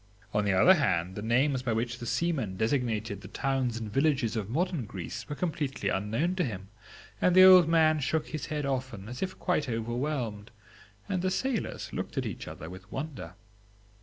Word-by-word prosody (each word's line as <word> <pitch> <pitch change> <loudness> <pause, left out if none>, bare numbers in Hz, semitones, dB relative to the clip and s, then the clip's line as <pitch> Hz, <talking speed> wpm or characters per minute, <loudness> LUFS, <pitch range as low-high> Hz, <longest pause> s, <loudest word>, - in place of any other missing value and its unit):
On 105 0 +1
the 100 - +2
other 135 - +7
hand, 95 - +1
the 105 - -6
names 130 +4 +2
by 125 -3 -1
which 120 +2 -2
the 120 - -6
seamen 135 - -1
designated 110 -4 -1
the 95 - -9
towns 130 +1 -1
and 110 -3 -6
villages 135 -6 +2
of 105 -3 -3
modern 165 0 -1
Greece 115 +2 -7
were 145 - -3
completely 150 -5 -2
unknown 115 - 0
to 180 - +2
him; 100 - -5 0.5
and 180 - +4
the 185 - +9
old 185 -3 +9
man 160 -2 +4
shook 155 +2 -1
his 155 -3 -4
head 150 -1 -2
often, 130 -7 -3
as 125 +2 -7
if 185 0 -3
quite 155 -6 0
overwhelmed, 120 -2 -3 0.6
and 185 -3 -1
the 185 - +1
sailors 255 +4 -2
looked - - -5
at - - 0
each - - -5
other 80 - -8
with 95 +3 -11
wonder. 145 0 -6
130 Hz, 190 wpm, -29 LUFS, 110-155 Hz, 0.6 s, the